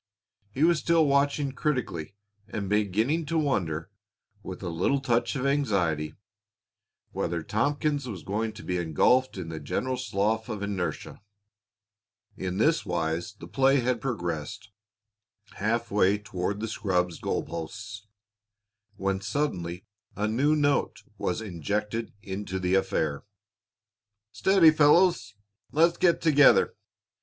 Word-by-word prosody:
He 130 +8 -1
was 170 -1 +4
still 165 -2 +3
watching 140 0 +2
critically 125 - -2 0.3
and 100 -2 -4
beginning 110 - +1
to 165 +2 0
wonder, 95 - -1 0.5
with 95 0 -8
a 90 - -3
little 90 +12 +1
touch 120 0 0
of 135 -1 -2
anxiety, 95 - 0 1.0
whether 85 -1 -2
Tompkins 145 - 0
was 95 -8 -6
going 110 +3 -2
to - - -11
be 90 - -2
engulfed 95 - +2
in 85 -3 -5
the 80 -1 -5
general 130 - -2
slough 110 -1 -1
of 105 -3 -4
inertia. 100 -2 -4 1.1
In 90 0 -4
this 155 +9 +3
wise 85 +1 -2
the - - -11
play 135 0 +3
had 125 -1 0
progressed 100 - -4 0.9
half 115 +3 -1
way 100 0 +3
toward 100 -1 -4
the 110 - -2
scrub's 90 -5 -1
goal - - -1
posts 105 +6 -7 0.9
when 95 -1 -1
suddenly 95 - -2 0.3
a 105 +1 -1
new 140 +8 +2
note 145 -1 +1 0.2
was 90 - -1
injected 105 +4 -3
into 95 -1 -4
the 90 0 -1
affair. 95 -7 0 1.1
"Steady, 170 - +5
fellows. 155 - +4 0.4
Let's 170 +3 +3
get 175 -2 +3
together. 145 -3 +5
105 Hz, 125 wpm, -27 LUFS, 95-140 Hz, 1.1 s, Steady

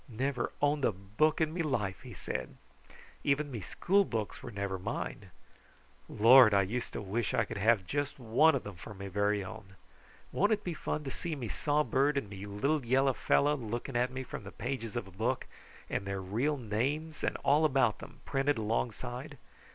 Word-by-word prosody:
"Never 130 +4 -1
owned 145 0 +2
a - - +4
book 105 +12 0
in 155 0 +1
me 175 - -1
life!" 105 - -1
he 125 -5 -10
said. - - -5 0.7
"Even 145 +1 +1
me 115 -4 -4
schoolbooks 125 - 0
were - - -7
never 100 -3 -3
mine. 100 -1 -4 0.8
Lord! 115 0 +8
How - - +5
I 100 - +4
used 120 +6 -3
to - - -4
wish 110 +5 -1
I 120 - +2
could 100 - -6
have 105 -2 +3
just 145 +6 -2
one 130 +6 +4
of - - -2
them 100 -2 -7
for 105 +5 -9
me 100 0 -7
very 100 +1 +1
own! 105 -2 -10 0.6
Won't 205 +3 +3
it 210 - -2
be 175 - -2
fun 155 - -3
to 135 - -5
see 170 +2 -4
me 125 -6 -5
sawbird 145 0 +1
and 105 -7 -3
me 100 0 -7
little 135 +9 0
yellow 135 +3 +3
fellow 145 +4 +3
looking 120 +1 -4
at 125 +1 +2
me 130 0 -4
from 120 - -7
the 100 - -8
pages 115 -4 -4
of 120 - -2
a 95 - -13
book, 115 +7 -1 0.4
and 100 - -3
their 100 0 -2
real 115 +11 0
names 135 +8 -2
and - - 0
all 145 +3 +5
about 135 -7 +3
them - - -12
printed 135 0 +1
alongside? 120 +5 -3
120 Hz, 195 wpm, -32 LUFS, 105-145 Hz, 0.8 s, Lord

